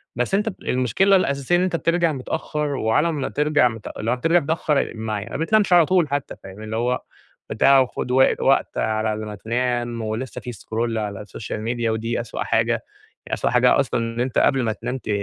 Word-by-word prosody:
بس 125 Hz, +10 st, -2 dB
أنتَ 210 Hz, +3 st, +2 dB
ب 190 Hz, -, -8 dB
المشكلة 130 Hz, -, +2 dB
الأساسية 140 Hz, -2 st, +1 dB
إن 175 Hz, -, +3 dB
أنتَ 185 Hz, -2 st, 0 dB
بترجع 170 Hz, 0 st, +1 dB
متأخّر، 150 Hz, +2 st, -3 dB
وعلى 130 Hz, +9 st, +1 dB
ما 145 Hz, -4 st, -3 dB
ترجَع 150 Hz, -3 st, +3 dB
مت 115 Hz, -2 st, -6 dB
لو 115 Hz, +2 st, -1 dB
هترجع 165 Hz, +8 st, +3 dB
متأخّر، 150 Hz, -1 st, 0 dB
مع 110 Hz, -2 st, -3 dB
ي -, -, -7 dB
ما 115 Hz, -, -6 dB
بتنامش 195 Hz, +3 st, +2 dB
على 170 Hz, -2 st, +7 dB
طول، 175 Hz, -4 st, +2 dB
حتى 140 Hz, -1 st, -3 dB
فاهم؟ 95 Hz, +3 st, -10 dB
اللي 110 Hz, +1 st, -5 dB
هو 125 Hz, +2 st, 0 dB, 0.5 s
بتاع 135 Hz, +5 st, +5 dB
وخُد 125 Hz, -1 st, -1 dB
وق 130 Hz, +1 st, +3 dB
وقت 135 Hz, -, +2 dB
على 110 Hz, 0 st, 0 dB
ما 105 Hz, -1 st, -6 dB
تنام. 120 Hz, +1 st, -2 dB
ولسَّه 110 Hz, +4 st, -4 dB
في 125 Hz, -, -6 dB
scroll 115 Hz, +3 st, -3 dB
على 105 Hz, -1 st, -4 dB
social 110 Hz, -, -6 dB
media، 115 Hz, +1 st, -2 dB
ودي 115 Hz, +2 st, -1 dB
أسوأ 115 Hz, -, -5 dB
حاجة، -, -, +1 dB, 0.5 s
يعني -, -, -6 dB
أسوأ -, -, 0 dB
حاجة -, -, +4 dB
أصلًا، -, -, 0 dB
إن 115 Hz, +1 st, -3 dB
أنتَ 125 Hz, 0 st, -1 dB
قبل 135 Hz, -3 st, +3 dB
ما 110 Hz, -1 st, 0 dB
تنام 125 Hz, +4 st, -4 dB
ت 110 Hz, -, -10 dB
125 Hz, 205 wpm, -22 LUFS, 110-150 Hz, 0.5 s, على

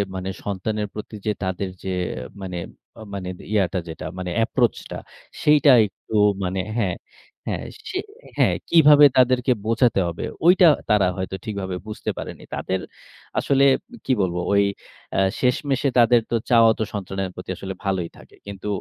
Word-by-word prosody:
মানে 95 Hz, 0 st, -4 dB
সন্তানের 105 Hz, +2 st, -2 dB
প্রতি 110 Hz, +1 st, -8 dB
যে, 105 Hz, -, +2 dB
তাদের 95 Hz, +1 st, -2 dB
যে, 95 Hz, -, -4 dB, 0.5 s
মানে 90 Hz, -2 st, -5 dB, 0.4 s
আ -, -, -10 dB
মানে 95 Hz, -2 st, -4 dB, 0.2 s
ইয়া 105 Hz, -3 st, +3 dB
টা 90 Hz, -, 0 dB
যেটা, 80 Hz, -, -7 dB
মানে 90 Hz, -1 st, -4 dB
approach 120 Hz, -1 st, +1 dB
টা, -, -, -4 dB, 0.5 s
সেইটা 150 Hz, -1 st, +6 dB, 0.2 s
একটু 110 Hz, -, -9 dB, 0.3 s
মানে 95 Hz, +1 st, -2 dB, 0.2 s
হ্যাঁ, 95 Hz, -6 st, 0 dB, 0.5 s
হ্যাঁ। -, -, -2 dB, 0.3 s
সে 370 Hz, -, -3 dB, 0.4 s
হ্যাঁ, -, -, +3 dB
কিভাবে 150 Hz, -3 st, +7 dB
তাদেরকে 125 Hz, 0 st, +4 dB
বোঝাতে 115 Hz, -1 st, +2 dB
হবে। 85 Hz, -1 st, -5 dB, 0.2 s
ঐটা 180 Hz, 0 st, +7 dB, 0.2 s
তারা 105 Hz, -3 st, +4 dB
হয়তো 95 Hz, +1 st, -3 dB
ঠিকভাবে 100 Hz, -3 st, -4 dB
বুঝতে 105 Hz, -, -5 dB
পারেনি। -, -, -7 dB
তাদের 95 Hz, 0 st, -2 dB, 0.6 s
আসলে 140 Hz, -1 st, +2 dB, 0.4 s
কি 135 Hz, -, 0 dB
বলবো? 90 Hz, -2 st, -1 dB
ওই 100 Hz, 0 st, +5 dB, 0.5 s
আ -, -, +3 dB, 0.2 s
শেষমেষে 135 Hz, +2 st, +1 dB
তাদের 120 Hz, 0 st, +5 dB
তো -, -, +2 dB
চাওয়া 115 Hz, -2 st, +6 dB
তো -, -, +1 dB
সন্তানের 95 Hz, -1 st, -3 dB
প্রতি 90 Hz, -, -9 dB
আসলে 95 Hz, +1 st, -5 dB
ভালোই 95 Hz, -3 st, -1 dB
থাকে। -, -, -17 dB
কিন্তু 100 Hz, 0 st, -7 dB
105 Hz, 155 wpm, -23 LUFS, 95-125 Hz, 0.6 s, কিভাবে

